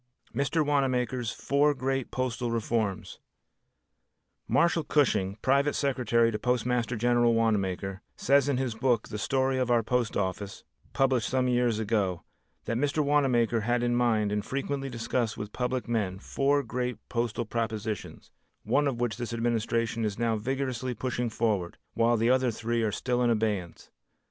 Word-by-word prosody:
Mr. 140 +3 +1
Wanamaker's 130 -4 0
Four 145 +1 +1
Great 135 -1 -2
Postal 125 -1 -2
Reforms 110 -3 -2 1.3
Marshall 165 +6 +2
Cushing, 105 -10 +1
private 140 +2 +2
secretary 120 -4 +2
to 105 - -3
Postmaster 125 0 0
General 120 0 +3
Wanamaker, 95 -3 0
says 140 +1 +3
in 135 - +1
his 130 -3 -1
book 120 -1 0
"The 105 -1 -5
Story 130 +2 +1
of 125 -1 0
Our 120 -1 +3
Post 120 0 0
Office," 95 +1 -3 0.3
published 130 -4 +2
some 130 0 +1
years 120 -2 +2
ago, 105 -5 0 0.4
that 115 - -1
Mr. 145 +3 +1
Wanamaker 125 -6 +2
had 120 +2 0
in 120 0 +1
mind 110 -4 +2
and 105 0 -1
frequently 135 0 -3
discussed 120 -1 -2
with 105 0 -6
public 125 0 -2
men, 105 -6 -1
four 140 +7 +1
great 125 0 -3
postal 120 -1 -2
propositions, 110 -2 -4 0.3
one 145 0 +2
of 125 -4 -2
which 120 -2 -1
this 120 -1 -4
administration 115 0 0
is 105 -2 -2
now 115 -1 +1
vigorously 130 +1 -2
pushing 120 +1 -2
forward, 105 -6 -1 0.2
while 115 +1 +3
the 115 +3 +3
other 130 -1 +3
three 115 +1 -1
are 110 -2 +1
still 125 +3 -1
in 120 - +3
abeyance. 105 -6 -2
120 Hz, 155 wpm, -28 LUFS, 110-130 Hz, 1.3 s, General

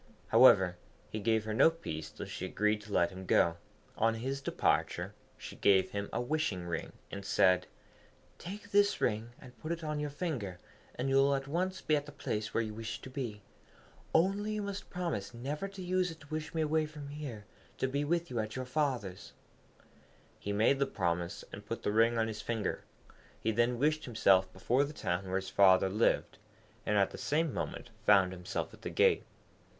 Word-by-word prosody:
However, 90 -2 +6 0.3
he 110 - -3
gave 110 +1 +1
her 110 - -2
no 130 +8 +6
peace 80 - -6
till - - -7
she - - -5
agreed 105 0 +1
to 105 0 -12
let 85 -2 +3
him 95 0 -9
go. 85 0 +4 0.4
On 115 0 +2
his 135 +4 -3
departure - - 0 0.2
she - - -9
gave 95 -2 +4
him 100 0 -3
a - - -1
wishing 125 - -1
ring, 85 -1 -4 0.2
and 100 - -6
said, 90 -2 +3 0.7
'Take 205 +3 -8
this 205 0 +4
ring, 110 0 0
and 125 -2 -13
put 155 - -5
it 170 -1 -3
on 150 -1 -2
your 150 0 -2
finger, 140 - -3 0.4
and 125 - -2
you 135 0 +3
will 140 +1 +5
at 135 0 -3
once 185 +5 -1
be 155 - +2
at 145 0 -2
the - - -8
place 105 -6 -3
where 115 - +1
you 110 -1 -5
wish 110 +1 -5
to 130 - -9
be. 115 -7 -5 0.7
Only, 200 +5 +2
you 210 -1 -2
must 200 0 -5
promise 165 - -3
never 145 +10 -3
to 195 -1 -8
use 180 0 +1
it 165 -1 -9
to 140 - -14
wish 155 -1 -4
me 160 - +2
away 155 0 +1
from 150 -2 -9
here 140 -8 -7 0.3
to 130 - 0
be 140 +2 -1
with 170 +1 0
you 120 - -1
at 110 0 -3
your 130 0 -3
father's.' 125 -9 -2 1.1
He 100 - -4
made 110 +7 +3
the 140 - +2
promise, 85 -6 -2
and - - -7
put - - -5
the - - +1
ring 115 +2 +4
on 115 0 +2
his 110 -1 -5
finger; 110 -4 -2 0.5
he 110 - 0
then 120 +2 +2
wished 155 +4 +1
himself 95 -6 +3
before 125 +8 +1
the 145 +1 -5
town 90 -8 -2
where 95 - -2
his 95 0 -2
father 95 -1 +6
lived, 105 +4 +1 0.5
and 105 - +2
at 100 -1 +3
the - - -8
same 155 0 0
moment 120 - -4
found 100 -4 +5
himself 90 -1 -4
at - - -15
the - - -4
gate. - - +3
120 Hz, 200 wpm, -32 LUFS, 100-150 Hz, 1.1 s, However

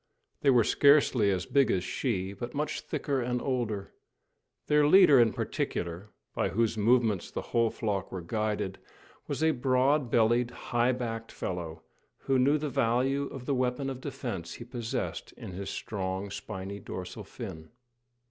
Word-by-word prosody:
They 140 - +4
were 125 -3 +6
scarcely 140 -5 +4
as 95 -2 0
big 140 -2 +3
as 90 - +1
she, 95 -2 -2
but 120 +5 -7
much 150 +1 -2
thicker 140 -2 -2
and 125 0 -1
older. 120 -7 -2 0.7
Their 150 -1 +4
leader 150 -5 +7
in 115 -2 +5
particular, 85 +4 -3 0.2
by - - 0
whose 115 +1 +1
movements 110 -3 +2
the - - -5
whole 115 -1 +4
flock 100 -5 -3
were 90 -2 -5
guided, 105 0 -2 0.5
was - - -2
a 160 - +5
broad 130 +1 +2
bellied 120 +1 +3
high 120 0 0
backed 115 -2 -4
fellow, 85 -3 -5 0.4
who 135 -1 +1
knew 140 +4 +4
the 150 0 -3
value 135 +1 +1
of 130 -2 -8
the 140 - 0
weapon 130 +1 0
of 130 -1 -7
defence 115 - -5
he - - -8
possessed 120 -2 -4
in - - -9
his 95 +2 -5
strong, 95 -1 -4
spiny 100 0 -6
dorsal 90 -1 -7
fin. 80 0 -8
120 Hz, 155 wpm, -29 LUFS, 100-130 Hz, 0.7 s, leader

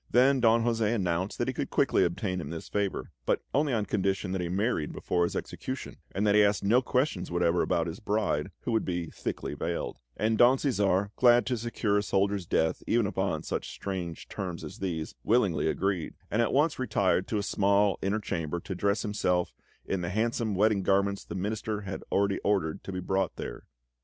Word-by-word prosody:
Then 130 +2 +5
Don 115 -1 +4
José 115 -1 +1
announced 95 -1 -1
that - - -1
he - - 0
could - - -3
quickly - - +3
obtain 90 +1 -1
him 70 - -6
this 80 0 -7
favour, 100 -2 -2 0.2
but - - +1
only 145 0 +2
on 110 -4 +1
condition 95 -1 -1
that 95 -1 -1
he 85 - -2
married 95 -4 0
before 85 -1 0
his - - -4
execution, - - -5
and 100 +3 -1
that 105 - +4
he 105 0 +6
asked 100 -1 +2
no 115 +6 +4
questions 125 -6 0
whatever 85 0 +2
about 85 - +1
his 85 +2 -5
bride, 105 -8 0
who - - -3
would 110 - +2
be 85 -2 -3
thickly - - -4
veiled; - - -3 0.2
and 110 0 +1
Don 125 +2 +7
Cæsar, 100 -7 +1
glad 120 -1 +6
to 125 - 0
secure 110 -3 0
a - - 0
soldier's 100 -2 0
death 80 0 +1
even 115 -2 +3
upon 95 -5 -1
such - - -3
strange 90 -4 -5
terms 90 -4 -5
as 75 - -8
these, 85 -5 -3
willingly 100 -11 +2
agreed, 95 0 -1 0.2
and 110 - +2
at 115 - +1
once 150 +1 +2
retired 95 -7 +1
to 110 - -1
a 100 - -1
small 100 0 +2
inner 100 +3 0
chamber 85 -4 -3
to 95 - -5
dress 100 +3 0
himself 90 -5 0 0.3
in 95 - -1
the 85 - -2
handsome 110 +1 0
wedding 105 +1 +3
garments 100 +1 +1
the - - -7
Minister 105 +2 -2
had 95 -1 -6
already 100 0 +2
ordered 95 -6 0
to - - -5
be 90 -1 -4
brought 95 -1 0
there. - - -7
100 Hz, 200 wpm, -29 LUFS, 90-110 Hz, 0.3 s, Don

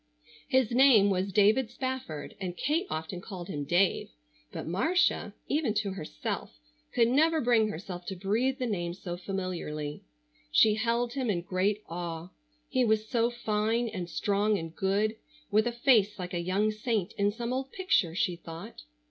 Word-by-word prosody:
His 260 -3 +2
name 240 -6 +6
was 190 +1 0
David 215 +5 +4
Spafford, 260 - -5
and 180 -2 -4
Kate 325 +7 0
often 160 +3 -4
called 185 -3 -8
him 145 -5 -3
Dave, 175 +5 +2 0.4
but - - -5
Marcia, 320 - +1
even 285 -7 0
to 205 -1 0
herself, - - -5 0.4
could 230 -1 +5
never 315 +6 +3
bring 235 -4 +3
herself 175 -2 -6
to 190 - -3
breathe 220 +8 0
the 255 - -2
name 175 -6 -2
so 180 -2 -5
familiarly. 175 -5 -4 0.5
She 210 - +5
held 235 +2 0
him 260 -4 -1
in 175 -4 0
great 195 +3 0
awe. 170 0 -5 0.4
He 260 -3 +1
was 220 -1 +2
so 235 0 +2
fine 225 0 0
and 180 -4 -5
strong 205 +3 +1
and 165 -2 -7
good, 205 +3 +1 0.3
with 215 +3 +4
a - - +1
face 235 -4 +3
like 180 -1 -6
a 175 - 0
young 195 +5 +1
saint 215 -3 -1
in 200 0 +1
some 235 +3 -3
old 265 +1 -3
picture, 290 - +1
she 180 -1 +1
thought. 165 - -9
210 Hz, 165 wpm, -29 LUFS, 180-240 Hz, 0.5 s, name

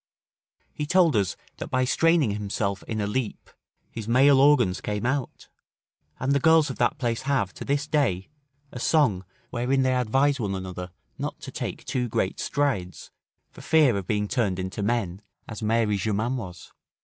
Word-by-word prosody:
He 150 - -4
told 175 -4 +4
us, 100 -5 +1 0.2
that - - -6
by 130 0 +1
straining 165 -3 +3
himself 100 -1 -2
in 110 -2 -3
a 105 - 0
leap 110 +2 -3 0.4
his 110 -2 -7
male 135 +3 +5
organs 135 -10 +4
came 105 +2 -3
out; 130 0 -2 0.7
and 130 +2 0
the 140 - +3
girls 160 -1 +4
of - - -8
that 120 - +1
place 120 -3 -1
have, 115 -9 +1
to - - -8
this 145 +1 0
day, 135 - 0 0.4
a 125 - -7
song, 120 - +2 0.3
wherein 130 +2 +1
they 130 0 +2
advise 135 +3 +2
one 100 -4 -2
another 90 -1 -6 0.3
not - - -4
to - - -8
take - - -5
too 125 -2 -1
great 95 - -1
strides, 130 - -2 0.4
for - - -13
fear 150 -8 +4
of 95 -2 -4
being 105 -1 0
turned 100 -6 0
into 95 +2 -4
men, 100 -4 -1 0.3
as 105 -1 -7
Mary 110 -1 +1
Germain 110 +5 -1
was. 90 -8 -8
120 Hz, 175 wpm, -25 LUFS, 100-135 Hz, 0.7 s, male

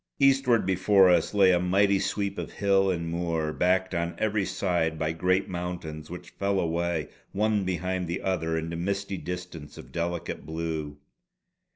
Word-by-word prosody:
Eastward 135 -5 +4
before 95 0 +5
us 90 - +2
lay 95 -2 +6
a 90 - +3
mighty 100 +2 +3
sweep 100 0 -2
of - - -6
hill 95 -1 +2
and 85 -2 -1
moor, 80 -2 -1
backed 95 +1 +1
on 85 0 -1
every 105 -2 0
side 85 -5 0
by 80 0 -1
great 95 +4 +1
mountains 85 -4 -5
which 90 0 -9
fell 100 0 0
away 85 -2 -1 0.3
one 105 0 +1
behind 90 0 -2
the 85 +3 -2
other 80 -4 0
into 80 +1 -3
misty 100 +3 -2
distance 90 -4 -7
of - - -11
delicate 85 0 -3
blue. 80 -2 -4
90 Hz, 160 wpm, -27 LUFS, 85-95 Hz, 0.3 s, lay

